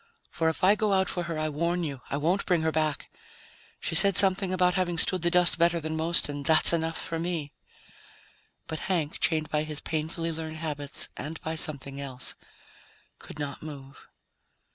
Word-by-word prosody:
"For 160 0 0
if 160 - -5
I 190 +2 +6
go 210 -1 0
out 190 -1 +2
for 175 -1 -3
her, 165 -2 -4
I 155 0 -1
warn 170 +4 -1
you 140 -5 -5
I 140 - -2
won't 170 +7 0
bring 175 -4 +2
her 160 - +1
back. 155 -2 -2 0.7
She - - -3
said 200 -1 +6
something 195 -1 +5
about 180 -1 +2
having 180 -2 -1
stood 185 +2 +2
the 175 - +2
dust 180 -1 +5
better 170 0 +3
than 155 0 -4
most, 165 +2 +1
and 145 -1 -5
that's 160 +2 +6
enough 165 -1 -1
for 165 - -4
me." 165 -4 -4 1.1
But 160 - -5
Hank, 165 -5 -1
chained 155 -2 +1
by 150 - +1
his 155 -1 -2
painfully 165 +1 -3
learned 160 0 -6
habits 145 -3 -4
and 155 +2 -7
by 160 - -4
something 140 -4 -5
else, 130 -2 -2 0.9
could - - -11
not 145 -1 -5
move. 140 -3 -11
160 Hz, 185 wpm, -27 LUFS, 150-175 Hz, 1.1 s, I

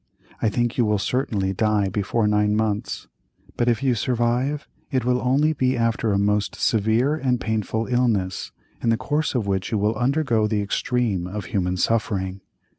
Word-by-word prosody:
I 110 - +3
think 120 +3 -1
you 120 - +4
will 105 -1 +2
certainly 100 -4 -1
die 105 0 +1
before 105 +3 0
nine 105 0 +2
months, 105 -1 -2 0.5
but 120 - 0
if 120 +1 +1
you 130 -2 +3
survive, 125 +5 0 0.2
it 130 -4 0
will 125 0 +2
only 140 +5 +2
be 130 -3 +1
after 115 -1 +1
a 100 - +2
most 105 +1 +1
severe 110 +6 +2
and 130 -5 0
painful 110 0 -1
illness, 115 -7 0 0.3
in 115 - +1
the 115 - +3
course 150 +4 -1
of 115 -5 0
which 95 +1 -1
you 110 - +1
will 105 +2 +1
undergo 125 -2 +1
the 105 -1 0
extreme 105 -3 -1
of 100 +1 -5
human 90 -2 -1
suffering. 95 -3 0
110 Hz, 175 wpm, -23 LUFS, 105-125 Hz, 0.5 s, you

